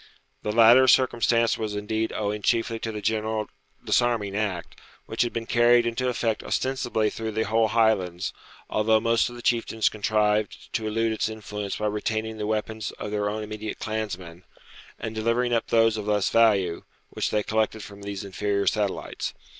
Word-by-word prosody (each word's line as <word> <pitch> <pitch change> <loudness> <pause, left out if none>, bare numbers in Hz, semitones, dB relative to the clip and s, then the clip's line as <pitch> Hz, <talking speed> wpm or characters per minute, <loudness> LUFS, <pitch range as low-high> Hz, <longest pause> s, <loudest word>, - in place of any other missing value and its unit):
The 105 - -2
latter 120 +4 +7
circumstance 120 -2 +3
was 110 -2 -3
indeed 110 +2 -2
owing 105 0 -2
chiefly 115 +2 +1
to 110 - -3
the 105 -1 -6
general 110 0 -1 0.4
disarming 115 -5 +1
act, 100 -5 -3 0.3
which 110 - -2
had 120 - +1
been 115 0 -4
carried 120 +1 +4
into 120 +2 -1
effect 115 -3 -1
ostensibly 120 -5 -1
through 110 -1 -4
the 110 +1 0
whole 110 +1 +2
Highlands, 105 -5 +1 0.3
although 110 +1 +2
most 115 +1 +2
of 120 - -10
the 120 - -10
chieftains 115 -2 +1
contrived 105 0 0
to 110 -1 -1
elude 115 +1 0
its 110 0 -1
influence 105 -2 -5
by 105 - -3
retaining 110 +1 -2
the 105 - -2
weapons 110 0 -2
of 105 - -6
their 105 -1 0
own 110 +1 -3
immediate 110 0 -6
clansmen, 95 -6 -5 0.5
and 110 - -5
delivering 115 +2 0
up 115 - +1
those 115 -1 +3
of 105 -1 -5
less 105 -2 +1
value, 100 -7 +3 0.3
which - - -1
they 105 -1 0
collected 110 0 -1
from 100 0 -11
these 100 -1 -5
inferior 100 +1 -1
satellites. 105 -3 -2
110 Hz, 170 wpm, -25 LUFS, 105-115 Hz, 0.5 s, latter